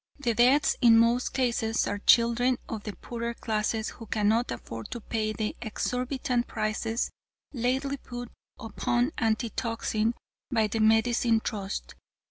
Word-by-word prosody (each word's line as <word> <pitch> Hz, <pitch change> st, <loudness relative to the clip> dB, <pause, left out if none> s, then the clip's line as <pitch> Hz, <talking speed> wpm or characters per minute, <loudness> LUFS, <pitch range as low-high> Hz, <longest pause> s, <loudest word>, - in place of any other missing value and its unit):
The 250 Hz, -5 st, 0 dB
deaths 255 Hz, +6 st, +4 dB
in 230 Hz, -2 st, +7 dB
most 235 Hz, +2 st, +3 dB
cases 235 Hz, -3 st, 0 dB
are 205 Hz, -, -2 dB
children 235 Hz, +3 st, +4 dB
of 220 Hz, -2 st, -5 dB
the 210 Hz, -, -5 dB
poorer 235 Hz, 0 st, -5 dB
classes 220 Hz, 0 st, -1 dB
who 225 Hz, -, -11 dB
cannot 220 Hz, +3 st, +1 dB
afford 115 Hz, -1 st, -6 dB
to 240 Hz, -, -5 dB
pay 215 Hz, -1 st, -2 dB
the 215 Hz, 0 st, -3 dB
exorbitant 250 Hz, +2 st, -1 dB
prices 225 Hz, +2 st, -2 dB, 0.4 s
lately 265 Hz, +3 st, 0 dB
put 245 Hz, -2 st, -8 dB, 0.3 s
upon 240 Hz, +4 st, 0 dB
antitoxin 225 Hz, 0 st, 0 dB, 0.4 s
by 225 Hz, -3 st, +3 dB
the 215 Hz, +1 st, -2 dB
Medicine 225 Hz, +1 st, +3 dB
Trust. 200 Hz, -3 st, -4 dB
230 Hz, 130 wpm, -28 LUFS, 220-245 Hz, 0.4 s, in